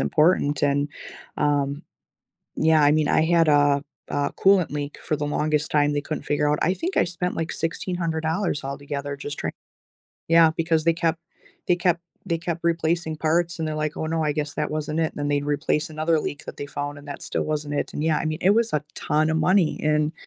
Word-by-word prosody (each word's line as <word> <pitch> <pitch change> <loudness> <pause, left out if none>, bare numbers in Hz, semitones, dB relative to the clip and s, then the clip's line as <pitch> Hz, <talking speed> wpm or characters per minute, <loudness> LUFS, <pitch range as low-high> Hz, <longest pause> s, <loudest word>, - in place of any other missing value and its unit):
important, 150 -3 +2
and, 145 0 +2 0.5
um, 145 0 0 0.7
yeah, 155 -1 +4
I 145 +1 +5
mean, 155 -1 +2
I 160 - +3
had 165 -1 +3
a 145 -1 +4 0.3
a 145 0 -1
coolant 190 -3 +3
leak 145 0 -4
for 155 - -1
the 145 - -3
longest 150 0 0
time 145 -1 +3
they 145 - 0
couldn't 155 - -5
figure 145 0 +1
out. 150 - +1
I 180 +3 +2
think 355 - -4
I - - +5
spent, 180 +1 -3
like, 165 0 -2
$1,600 165 0 -2
altogether 140 0 -4
just 145 +1 -6
try - - -2 0.8
Yeah, 165 -1 +6
because 165 -1 +1
they 165 - +4
kept 165 0 0 0.5
they 180 - +4
kept 175 -1 +1 0.3
they 170 -3 0
kept 170 0 -4
replacing 165 -1 0
parts, 170 +2 0
and 160 - -1
they're 155 - -3
like, 155 0 -2
"Oh, 160 - -2
no, 160 0 0
I 150 - +1
guess 150 -1 -3
that - - -2
wasn't 155 +1 -2
it." 160 - 0
Then 145 0 -2
they'd 145 0 +1
replace 150 +1 0
another 155 +1 +1
leak 145 - -5
that - - -7
they 145 - -4
found, 145 0 -4
and 145 - -14
that - - -7
still - - -2
wasn't 150 -1 -3
it, - - -2
and, - - -3
yeah, 160 -2 +2
I - - -3
mean, 155 0 -1
it 190 - +5
was 230 -1 +2
a 150 - +2
ton 155 +1 +1
of - - 0
money, 185 -1 +2
and, 150 0 +2
155 Hz, 215 wpm, -24 LUFS, 145-165 Hz, 0.8 s, Yeah